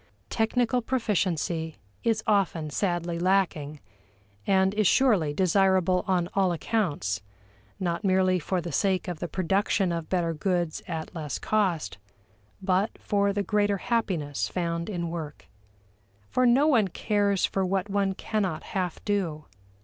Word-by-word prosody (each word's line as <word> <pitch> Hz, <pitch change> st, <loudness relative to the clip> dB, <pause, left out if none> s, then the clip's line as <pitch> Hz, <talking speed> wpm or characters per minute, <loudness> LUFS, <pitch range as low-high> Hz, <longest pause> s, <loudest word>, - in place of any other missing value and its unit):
Technical 245 Hz, +2 st, +1 dB
proficiency 180 Hz, -, -1 dB, 0.3 s
is 225 Hz, -2 st, +1 dB
often 190 Hz, -8 st, +1 dB
sadly 175 Hz, -1 st, -1 dB
lacking, 170 Hz, -6 st, +1 dB, 0.7 s
and 190 Hz, 0 st, +3 dB
is 210 Hz, -2 st, +2 dB
surely 210 Hz, -, +3 dB
desirable 185 Hz, +1 st, +2 dB
on 180 Hz, -2 st, +1 dB
all 190 Hz, -2 st, +2 dB
accounts 165 Hz, -, -1 dB, 0.6 s
not 175 Hz, +1 st, -2 dB
merely 185 Hz, -1 st, +3 dB
for 180 Hz, +3 st, -1 dB
the 170 Hz, 0 st, -5 dB
sake 190 Hz, +5 st, +1 dB
of 175 Hz, -3 st, -4 dB
the 175 Hz, -, -3 dB
production 190 Hz, +2 st, +1 dB
of 165 Hz, -1 st, -4 dB
better 170 Hz, -3 st, 0 dB
goods 175 Hz, 0 st, -1 dB
at 160 Hz, -1 st, -5 dB
less 155 Hz, -6 st, -4 dB
cost, 180 Hz, -, 0 dB, 0.6 s
but 190 Hz, +3 st, +2 dB
for 200 Hz, -1 st, +1 dB
the 200 Hz, 0 st, -1 dB
greater 205 Hz, 0 st, +1 dB
happiness 160 Hz, -, -1 dB
found 170 Hz, -, -2 dB
in 170 Hz, -4 st, -3 dB
work. 155 Hz, -3 st, -6 dB, 0.9 s
For 255 Hz, 0 st, +3 dB
no 260 Hz, +5 st, +5 dB
one 240 Hz, -10 st, +4 dB
cares 200 Hz, +1 st, +1 dB
for 195 Hz, -, -1 dB
what 190 Hz, +1 st, 0 dB
one 195 Hz, -1 st, 0 dB
cannot 190 Hz, -7 st, -2 dB
half 180 Hz, -3 st, -2 dB
do. 175 Hz, -7 st, -1 dB
185 Hz, 135 wpm, -27 LUFS, 170-205 Hz, 0.9 s, no